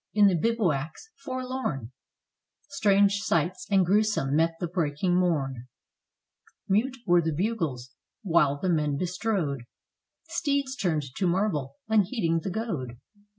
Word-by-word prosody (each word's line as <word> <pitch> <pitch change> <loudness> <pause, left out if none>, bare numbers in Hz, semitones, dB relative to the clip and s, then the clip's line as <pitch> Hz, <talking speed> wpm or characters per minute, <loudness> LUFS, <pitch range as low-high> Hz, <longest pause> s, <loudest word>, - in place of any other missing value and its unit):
In 210 -1 +6
the 195 - +5
bivouacs 170 - -1
forlorn 255 - -4 0.8
Strange 200 -7 +3
sights 185 +4 -1
and 195 -2 +4
gruesome 205 -7 +2
met 165 +1 +2
the 175 - -1
breaking 170 +1 0
morn: 135 -9 0 1.0
Mute 245 +7 +1
were 175 -2 +5
the 160 0 -1
bugles, 155 - -2 0.3
while 150 -7 +3
the 185 - -2
men 150 -4 +1
bestrode 180 - -1 0.7
Steeds 280 -3 -1
turned 170 - 0
to 185 - +1
marble, 170 -7 0
unheeding 205 -5 +2
the 190 - -4
goad. 170 - -4
180 Hz, 120 wpm, -27 LUFS, 150-215 Hz, 1.0 s, In